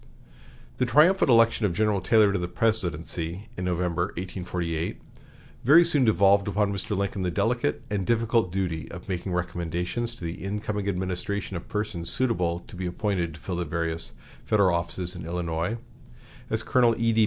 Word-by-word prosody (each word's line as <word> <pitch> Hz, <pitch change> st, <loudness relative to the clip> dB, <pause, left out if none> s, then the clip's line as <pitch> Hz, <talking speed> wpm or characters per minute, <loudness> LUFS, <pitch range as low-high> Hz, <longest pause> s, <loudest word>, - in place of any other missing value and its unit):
The 125 Hz, -, +2 dB
triumphant 155 Hz, -, +5 dB
election 115 Hz, -1 st, +5 dB
of 90 Hz, -, -2 dB
General 105 Hz, -1 st, +2 dB
Taylor 105 Hz, +1 st, +4 dB
to 100 Hz, -, 0 dB
the 90 Hz, -, -2 dB
presidency 90 Hz, -2 st, -2 dB
in 90 Hz, -, -4 dB
November, 90 Hz, -1 st, 0 dB
1848, 90 Hz, -2 st, -3 dB, 0.6 s
very 150 Hz, +8 st, +8 dB
soon 150 Hz, -6 st, +2 dB
devolved 100 Hz, -1 st, +4 dB
upon 100 Hz, 0 st, +1 dB
Mr. 100 Hz, +1 st, -2 dB
Lincoln 100 Hz, 0 st, -1 dB
the 90 Hz, -, 0 dB
delicate 120 Hz, -, 0 dB
and 100 Hz, -2 st, 0 dB
difficult 115 Hz, -2 st, +1 dB
duty 90 Hz, -4 st, -2 dB
of 90 Hz, +3 st, -9 dB
making 95 Hz, -1 st, -3 dB
recommendations 90 Hz, +6 st, -2 dB
to 95 Hz, -, -12 dB
the 85 Hz, 0 st, -5 dB
incoming 105 Hz, 0 st, -2 dB
administration 95 Hz, +1 st, -3 dB
of 85 Hz, -, -6 dB
persons 105 Hz, -5 st, -3 dB
suitable 90 Hz, -9 st, 0 dB
to -, -, -14 dB
be 90 Hz, 0 st, -3 dB
appointed 90 Hz, -3 st, -1 dB
to -, -, -12 dB
fill 90 Hz, -2 st, -4 dB
the 90 Hz, -, -1 dB
various 80 Hz, +1 st, -1 dB, 0.3 s
Federal 100 Hz, -4 st, +3 dB
offices 90 Hz, +1 st, -2 dB
in 90 Hz, -, -7 dB
Illinois, 85 Hz, +4 st, -2 dB, 0.7 s
as -, -, 0 dB
Colonel 120 Hz, -2 st, +3 dB
E.D. 115 Hz, -1 st, +2 dB
95 Hz, 165 wpm, -26 LUFS, 85-110 Hz, 0.7 s, very